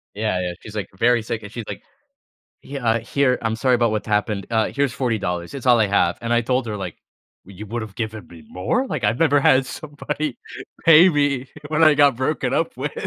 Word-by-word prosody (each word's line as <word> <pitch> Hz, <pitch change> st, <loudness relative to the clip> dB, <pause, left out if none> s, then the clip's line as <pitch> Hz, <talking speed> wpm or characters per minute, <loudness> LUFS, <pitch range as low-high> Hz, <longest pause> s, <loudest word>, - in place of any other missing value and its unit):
Yeah, 105 Hz, -3 st, -1 dB
yeah. 90 Hz, -1 st, -3 dB
She's 105 Hz, -, -11 dB
like, 105 Hz, -4 st, -4 dB
very 120 Hz, +3 st, +3 dB
sick 110 Hz, 0 st, -5 dB
and 105 Hz, -, -9 dB
she's 115 Hz, -1 st, -6 dB
like -, -, -7 dB, 0.8 s
"Yeah, 120 Hz, -5 st, -1 dB
here, 125 Hz, +3 st, +1 dB
I'm 110 Hz, -1 st, -1 dB
sorry 125 Hz, +1 st, +2 dB
about 120 Hz, -1 st, +2 dB
what 110 Hz, -1 st, -3 dB
happened, 105 Hz, -1 st, -1 dB
uh, 110 Hz, -1 st, +1 dB
here's 140 Hz, -2 st, -1 dB
$40, 115 Hz, -3 st, -1 dB
dollars 90 Hz, 0 st, -4 dB
it's 135 Hz, -2 st, -7 dB
all 120 Hz, -1 st, +6 dB
I 110 Hz, -, +4 dB
have." 95 Hz, -3 st, +1 dB
And 115 Hz, 0 st, -2 dB
I 120 Hz, 0 st, +3 dB
told 125 Hz, +1 st, 0 dB
her, 105 Hz, -2 st, -4 dB
like, 95 Hz, -4 st, -6 dB, 0.5 s
"Well, 100 Hz, -, -14 dB
you 105 Hz, +3 st, -8 dB
would've 110 Hz, -1 st, -5 dB
given 110 Hz, -4 st, -5 dB
me 80 Hz, -3 st, -14 dB
more." 95 Hz, -, -1 dB
Like, 125 Hz, -, -4 dB
I've 105 Hz, +4 st, +1 dB
never 145 Hz, -3 st, +3 dB
had 130 Hz, -1 st, +4 dB
somebody 150 Hz, 0 st, -5 dB, 0.5 s
pay 165 Hz, +3 st, +8 dB
me 145 Hz, -5 st, 0 dB, 0.2 s
when 155 Hz, +1 st, +1 dB
I 155 Hz, -2 st, +7 dB
got 145 Hz, -4 st, +4 dB
broken 130 Hz, +5 st, -1 dB
up -, -, -1 dB
with. -, -, -3 dB
115 Hz, 220 wpm, -21 LUFS, 105-140 Hz, 0.8 s, pay